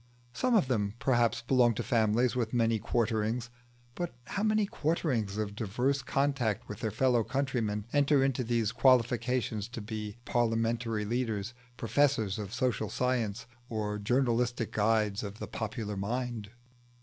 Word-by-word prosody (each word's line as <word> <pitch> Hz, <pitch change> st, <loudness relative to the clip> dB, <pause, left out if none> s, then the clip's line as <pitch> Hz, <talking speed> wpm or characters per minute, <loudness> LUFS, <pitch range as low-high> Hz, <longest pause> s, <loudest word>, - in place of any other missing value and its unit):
Some 250 Hz, -, +1 dB
of 195 Hz, -12 st, +4 dB
them, 105 Hz, -5 st, 0 dB
perhaps, 120 Hz, -3 st, +2 dB
belong 120 Hz, -2 st, +4 dB
to -, -, -2 dB
families 115 Hz, +1 st, +2 dB
with 120 Hz, -1 st, -1 dB
many 115 Hz, -2 st, +2 dB
quarterings; 115 Hz, +2 st, -1 dB, 0.4 s
but 175 Hz, -2 st, -4 dB
how 200 Hz, -, -3 dB
many 215 Hz, -1 st, +3 dB
"quarterings" 140 Hz, -, -1 dB
of 105 Hz, -1 st, -2 dB
diverse 125 Hz, +7 st, 0 dB
contact 135 Hz, -5 st, 0 dB
with 105 Hz, -, -7 dB
their 115 Hz, -2 st, -1 dB
fellow 120 Hz, +1 st, +2 dB
countrymen 115 Hz, -6 st, -1 dB
enter 145 Hz, -1 st, +4 dB
into 135 Hz, -1 st, +1 dB
their 115 Hz, -1 st, 0 dB
qualifications 120 Hz, -2 st, +2 dB
to 120 Hz, -1 st, -7 dB
be 105 Hz, 0 st, -5 dB
parliamentary 115 Hz, -1 st, 0 dB
leaders, 110 Hz, -2 st, -2 dB, 0.2 s
professors 115 Hz, -5 st, +1 dB
of 100 Hz, -2 st, -5 dB
social 125 Hz, +1 st, 0 dB
science, 120 Hz, -4 st, -1 dB, 0.2 s
or 105 Hz, -2 st, -2 dB
journalistic 120 Hz, 0 st, +1 dB
guides 105 Hz, -1 st, +1 dB
of 105 Hz, 0 st, -6 dB
the -, -, -5 dB
popular 110 Hz, -1 st, -4 dB
mind? 115 Hz, +1 st, -3 dB
115 Hz, 140 wpm, -30 LUFS, 110-125 Hz, 0.4 s, of